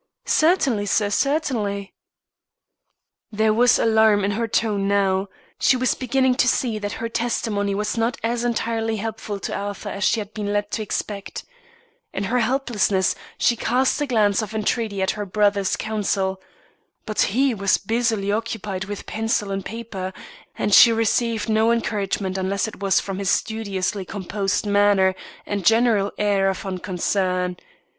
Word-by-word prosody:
"Certainly, 275 - +2
sir, 205 0 +1
certainly." 215 -8 -1 1.4
There 215 0 +2
was 240 +2 +4
alarm 220 -2 +4
in 200 - 0
her 230 +3 -1
tone 205 -3 0
now, 195 -1 +1 0.3
she 255 - +4
was 255 0 +1
beginning 260 +1 +1
to - - +3
see 230 -4 +1
that 205 0 -4
her 230 0 -4
testimony 225 -4 -1
was 210 +2 -2
not 230 +2 0
as 235 +1 -1
entirely 225 -1 -1
helpful 215 -1 -5
to - - -4
Arthur 205 +1 -5
as 200 0 -4
she 230 - +2
had 210 0 -7
been 205 -1 -3
led 205 0 -1
to 220 - -2
expect. 205 -1 -4 0.7
In - - -2
her 245 +6 0
helplessness, 220 -6 +1 0.2
she 240 - +2
cast 255 +5 +1
a 290 - 0
glance 215 -4 +2
of 215 0 -6
entreaty 215 -2 -1
at 190 - +1
her 210 - -4
brother's 200 0 +1
counsel. 195 -3 -2 0.6
But 215 -2 -1 0.2
he 270 -1 +3
was 200 -2 +2
busily 220 -2 0
occupied 210 -3 -3
with 205 0 -7
pencil 220 -2 -1
and 195 0 -3
paper, 205 -5 -6 0.4
and 205 - 0
she 235 - +9
received 225 0 0
no 220 +1 +3
encouragement 200 -4 -1
unless 195 +2 -1
it 220 - -9
was 195 -1 +2
from 195 -1 -5
his 195 -1 -1
studiously 200 -3 -1
composed 195 +1 -2
manner 200 -2 +3 0.3
and 200 -2 -3
general 225 -1 +3
air 200 -2 +2
of 190 +1 -4
unconcern. 185 -1 -1
210 Hz, 155 wpm, -22 LUFS, 195-230 Hz, 1.4 s, she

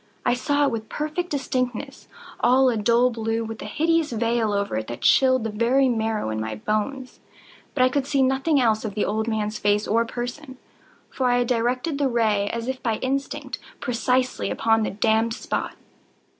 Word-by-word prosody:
I - - +3
saw 285 +3 +1
it 280 - +2
with 220 -1 -5
perfect 310 +6 -3
distinctness—all 255 -1 -1
a 240 - 0
dull 235 +3 +3
blue, 225 0 -2
with 225 -1 -7
a - - -6
hideous 330 -1 +1
veil 230 -1 0
over 200 - -1
it 110 - -4
that 120 - -7
chilled 260 -2 +4
the 225 - -2
very 245 +5 +2
marrow 220 - -1
in 110 0 -2
my 110 0 -4
bones; 215 - -3 0.6
but 255 - +3
I 255 - +5
could 275 +1 -1
see 275 -2 +2
nothing 270 +3 +2
else 220 -3 +2
of 210 -3 -5
the 210 - +1
old 220 +1 -1
man's 215 -1 -2
face 205 +1 +1
or 230 +2 +2
person: 250 +4 -6 0.5
for 260 - 0
I 245 0 +3
had 245 -1 +1
directed 250 +5 0
the 280 -2 +2
ray 215 -4 +1
as 230 +1 -4
if 260 0 -3
by 225 -2 0
instinct, 275 +1 -3 0.2
precisely 250 +1 0
upon 225 0 +2
the 215 - 0
damned 220 +2 +1
spot. - - -3
240 Hz, 185 wpm, -24 LUFS, 220-260 Hz, 0.6 s, I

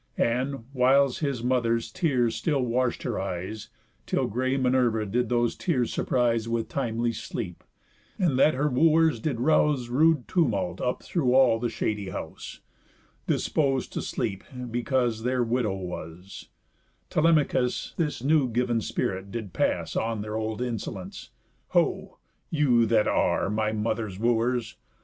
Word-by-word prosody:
And 125 +1 0
(whiles 135 +1 +3
his 140 -6 -2
mother's 120 -2 +1
tears 130 -10 +1
still 145 -5 0
wash'd 125 +1 0
her 120 - -2
eyes, 95 +3 -5 0.4
Till - - +1
grey 130 +5 -1
Minerva 125 -4 +2
did 120 +3 -1
those 120 -1 +1
tears 130 -9 -1
surprise 115 -2 +1
With 115 -1 -1
timely 120 -3 -1
sleep, 105 -5 -6 0.5
and 160 -9 +1
that 155 +1 +5
her 145 +3 +1
wooers 155 0 +3
did 125 -1 -2
rouse 145 -2 +2
Rude 150 +1 +3
tumult 110 - 0
up 125 - -2
through 130 -8 +1
all 130 -4 +5
the 120 0 -1
shady 105 -4 -2
house, 85 -5 -7 0.7
Dispos'd 135 -4 0
to - - -2
sleep 100 -4 -3 0.3
because 120 -1 0
their 125 +1 +1
widow 115 -4 0
was) 90 0 -8 0.6
Telemachus 150 -6 +2
this 150 -7 -2
new 145 -2 +3
giv'n 120 0 0
spirit 95 -1 -3
did 105 -4 -6
pass - - -1
On 115 -1 -1
their 105 0 -5
old 110 +2 -2
insolence: 110 -6 -5 0.5
"Ho! - - 0 0.3
you 125 -7 +3
that 110 -1 +3
are, - - +1
My 110 0 0
mother's 110 -2 -2
wooers! 115 +1 0
120 Hz, 140 wpm, -26 LUFS, 110-130 Hz, 0.7 s, that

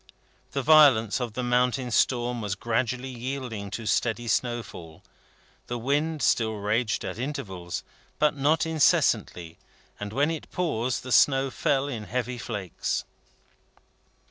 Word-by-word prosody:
The 140 - -1
violence 135 -7 +6
of 120 -3 -3
the 125 - -3
mountain 125 +1 +1
storm 120 +1 +1
was 100 -2 -2
gradually 125 +4 -2
yielding 125 -4 -5
to 110 +3 -6
steady 120 +2 0
snowfall. 105 -8 -3 0.6
The 120 - -3
wind 145 +4 -1
still 110 -2 +2
raged 105 +1 -1
at - - -5
intervals, 105 -11 -5 0.3
but 150 0 +2
not 150 +4 +2
incessantly; 90 - +1 0.4
and 105 0 -5
when 145 +7 +1
it 160 - -6
paused, 130 -9 -1
the 130 - -7
snow 135 +1 +4
fell 140 +1 0
in 115 -7 -5
heavy 125 +1 -3
flakes. 105 -7 -3
125 Hz, 130 wpm, -26 LUFS, 110-135 Hz, 0.6 s, violence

